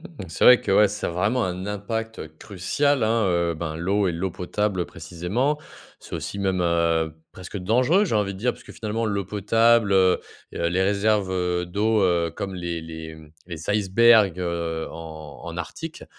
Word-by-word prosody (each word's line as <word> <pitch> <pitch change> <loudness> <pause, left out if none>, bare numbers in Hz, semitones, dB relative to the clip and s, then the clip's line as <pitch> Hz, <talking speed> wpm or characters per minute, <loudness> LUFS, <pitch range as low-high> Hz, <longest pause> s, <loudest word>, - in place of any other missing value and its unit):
Mmh, 165 - -10
c'est 80 - -1
vrai 125 0 +9
que, - - -1
ouais, 105 +1 +6
ça 105 +1 -3
a - - -3
vraiment 105 +8 0
un 90 +1 -4
impact, 110 +2 -4
heu, 80 - -6
crucial, 120 +9 0
hein, 110 -1 +2
heu, 85 -2 +1
ben, 80 -1 -4
l'eau 95 +4 +1
et - - -1
l'eau 90 +3 -2
potable, 95 +1 -2
précisément. 90 - -2 0.4
C'est - - -9
aussi 100 - -5
même, 95 -2 0
heu, 85 -2 +1 0.2
presque 95 +2 -8
dangereux, 125 - +3
j'ai 165 - -1
envie 105 -2 +1
de 95 - -9
dire, 125 +4 +1
puisque - - -14
finalement, 115 +1 -3
l'eau 100 -2 -1
potable, 115 +1 +3
heu, 95 -1 +4 0.3
et 85 0 -1
les 95 +2 +1
réserves, 100 0 +1
heu, 90 -1 -1
d'eau, 105 +4 +1
heu, 85 -2 +2
comme 95 -1 -5
les 85 -2 -4
les, 80 0 -8
mmh, 75 -1 -16
les 85 +1 -5
icebergs, 105 -1 +4
heu, 85 -2 -3
en 80 -3 -9
en 85 -1 -6
Arctique, 160 - -7
95 Hz, 190 wpm, -24 LUFS, 85-110 Hz, 0.4 s, vrai